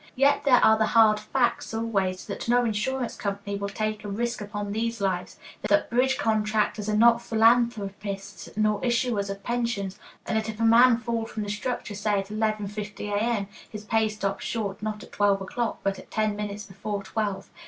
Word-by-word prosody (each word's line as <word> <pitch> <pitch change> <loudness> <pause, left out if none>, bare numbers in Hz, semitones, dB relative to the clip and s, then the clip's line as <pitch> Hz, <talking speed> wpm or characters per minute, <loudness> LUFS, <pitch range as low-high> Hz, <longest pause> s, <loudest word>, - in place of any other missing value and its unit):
Yet 280 +2 +3
there 255 -3 +6
are 220 0 +5
the 220 - +3
hard 215 -2 +6
facts 235 +1 0
always, 195 -5 -1
that - - -5
no 245 0 +4
insurance 235 +3 -1
company 200 0 -3
will 200 0 -3
take 215 0 -3
a - - -6
risk 235 +3 -2
upon 205 0 -4
these 230 +2 -2
lives, 190 -2 -2 0.3
that - - +2
bridge 265 +2 +2
contractors 215 -3 0
are 210 - +1
not 235 +1 +6
philanthropists 210 -4 +1
nor 215 -1 +2
issuers 235 -4 0
of 195 0 -6
pensions, 230 -5 -2 0.3
and - - -2
that 220 0 -4
if 215 0 -6
a - - 0
man 235 +1 +7
fall 230 -1 -2
from 215 - -4
the 205 - -5
structure, 225 0 -3
say 205 0 0
at 195 0 -3
11.50 210 -1 -3
A.M., 210 -1 0 0.2
his 210 -1 -8
pay 220 0 +2
stops 200 -2 -3
short 200 -4 -3
not 215 -1 -4
at - - -14
twelve 205 -1 +2
o'clock, 225 +4 -3
but 195 -1 -1
at - - -14
ten 215 -1 0
minutes 210 0 -5
before 200 +1 -5
twelve. 205 -1 -3
215 Hz, 185 wpm, -26 LUFS, 205-230 Hz, 0.3 s, man